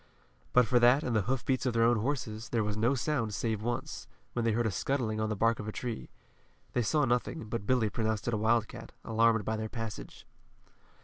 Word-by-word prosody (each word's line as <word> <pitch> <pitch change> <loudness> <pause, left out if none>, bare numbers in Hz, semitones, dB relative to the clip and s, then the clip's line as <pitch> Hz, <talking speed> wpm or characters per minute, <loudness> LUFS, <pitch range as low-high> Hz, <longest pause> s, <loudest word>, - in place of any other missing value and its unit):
But 125 -1 +5
for 120 +2 +3
that 125 +5 +5
and 120 - -1
the 110 - +3
hoofbeats 130 0 0
of 125 - 0
their 115 - +4
own 120 0 +4
horses, 115 -3 -3
there 115 -2 +1
was 105 0 -2
no 115 +6 +2
sound 120 -5 -1
save 110 0 -1
once, 110 - -4 0.3
when 120 - -1
they 115 -1 +2
heard 120 +2 +1
a 110 - +1
scuttling 110 +1 -1
on 110 0 0
the 105 - -1
bark 115 +3 +2
of 105 - -5
a - - -2
tree. 120 0 -5 0.6
They 125 - +2
saw 145 +6 +2
nothing, 120 +1 -1
but 110 -3 -4
Billy 120 -5 +2
pronounced 110 -2 -1
it 120 - 0
a - - +1
wildcat, 110 0 0
alarmed 115 -1 +3
by 110 0 -1
their 110 0 -4
passage. 115 -2 -7
115 Hz, 220 wpm, -30 LUFS, 110-120 Hz, 0.6 s, But